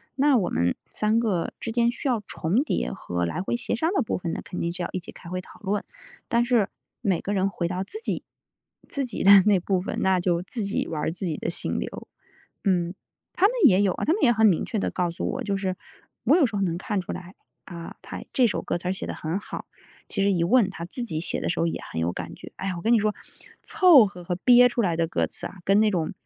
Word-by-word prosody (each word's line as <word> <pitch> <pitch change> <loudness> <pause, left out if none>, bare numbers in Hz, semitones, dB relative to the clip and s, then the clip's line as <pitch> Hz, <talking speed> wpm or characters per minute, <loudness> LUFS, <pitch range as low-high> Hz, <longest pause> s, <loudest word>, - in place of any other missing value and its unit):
那 280 0 +4
我 200 -7 +2
们 85 +1 +1 0.2
3 215 +1 +2
个 200 -8 -1
之 230 - -4
间 235 0 +3
需 265 - -5
要 240 -3 +2
重 200 - 0
叠 60 - -1
和 90 +6 -3
来 85 - -2
回 195 - -1
协 240 -1 -2
商 320 - 0
的 385 - +2
部 225 - -1
分 175 -2 -4
呢 - - -4
肯 180 - -6
定 170 0 -1
是 180 - -3
要 - - -3
一 185 - -2
起 170 - -11
开 170 - -11
会 185 +1 -3
讨 185 - -13
论。 205 0 -1 0.4
但 235 0 +2
是 240 -5 +2 0.3
每 195 -7 +1
个 200 - -4
人 190 -1 +2
回 175 -3 -2
到 185 +1 -2
自 430 - -5
己 - - -2 0.6
自 280 -3 -2
己 240 - -4
的 195 -1 +9
那 205 -3 +5
部 185 +1 0
分， 180 - -4
那 190 -1 +3
就 175 -1 +1
自 215 +5 -5
己 200 +1 -1
玩 155 -2 -3
儿 - - 0
自 185 +3 -5
己 155 - -2
的 - - -4
心 - - -3
流 - - -6 0.6
嗯。 180 -3 +1 0.4
他 375 +2 +5
们 455 - -2
也 190 -3 +5
有 190 -3 +2
啊， - - -5
他 - - +2
们 415 - -2
也 240 - +6
很 220 0 +4
明 190 -6 +3
确 225 - -3
地 - - 0
告 180 -2 0
诉 170 - -4
我 - - -4
就 200 -1 -1
是 190 -2 -2 0.5
我 275 - +6
有 340 -5 +5
时 215 -4 -2
候 - - -1
能 170 -3 0
看 205 +2 -2
出 180 - -5
来， 180 +1 -9 0.3
啊， 170 -2 -9
他 - - -7
这 255 - +4
首 220 - 0
歌 - - -2
词 180 +1 -4
儿 - - +2
写 190 - -4
得 - - -3
很 160 +5 -3
好， - - -7 0.5
其 - - 0
实 200 - +3
一 170 -2 +1
问 215 +2 +4
他 180 -3 -7
自 235 +8 -5
己 160 -8 -3
写 - - 0
的 - - -3
时 170 - -1
候 165 - +2
也 165 - -2
很 80 - -3
有 85 +1 0
感 - - -6
觉。 - - -11
哎 195 - -4
呀， 185 - -2
我 170 - -6
跟 225 - +1
你 235 - +6
说 210 0 0 0.5
凑 360 - +7
合 180 -3 -8
和 180 - -1
憋 245 +6 +6
出 240 -1 -1
来 175 -6 0
的 165 -1 +1
歌 - - 0
词 - - -4
啊， 185 - -14
跟 195 +3 +4
那 215 0 +4
种 170 -6 -1
195 Hz, 290 characters per minute, -25 LUFS, 175-230 Hz, 0.6 s, 的